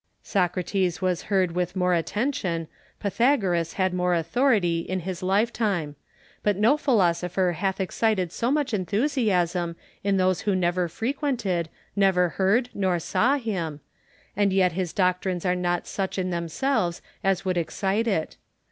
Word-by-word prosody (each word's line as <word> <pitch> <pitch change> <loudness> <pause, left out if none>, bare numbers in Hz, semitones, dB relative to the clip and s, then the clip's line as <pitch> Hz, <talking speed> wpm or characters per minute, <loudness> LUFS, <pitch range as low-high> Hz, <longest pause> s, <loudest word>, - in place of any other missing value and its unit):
Socrates 180 -1 0
was 185 -2 0
heard 190 -4 +2
with 180 +1 -2
more 180 -1 +2
attention, 175 - -1 0.3
Pythagoras 200 - +1
had 185 -1 0
more 180 0 +1
authority 175 - +2
in 185 +2 -3
his 185 +1 -5
lifetime; 195 -5 0 0.5
but 205 -2 +1
no 225 +8 +4
philosopher 180 - +1
hath 190 +3 -2
excited 190 -1 0
so 235 - -1
much 285 -3 0
enthusiasm 185 - 0 0.3
in 200 -1 +2
those 185 -1 +2
who 200 -2 +1
never 180 0 +1
frequented, 225 - -2 0.3
never 190 -3 +3
heard 215 +8 +1
nor 190 -3 +1
saw 250 - +2
him; 180 - -3 0.6
and 200 -1 +2
yet 185 -1 +3
his 180 0 -2
doctrines 180 -1 0
are 180 - +3
not 175 -1 -1
such 195 -1 -3
in 185 -1 -1
themselves 175 - -1 0.2
as 195 -1 +1
would 185 -1 0
excite 195 +6 -1
it. 175 -8 -1
185 Hz, 140 wpm, -25 LUFS, 175-210 Hz, 0.6 s, no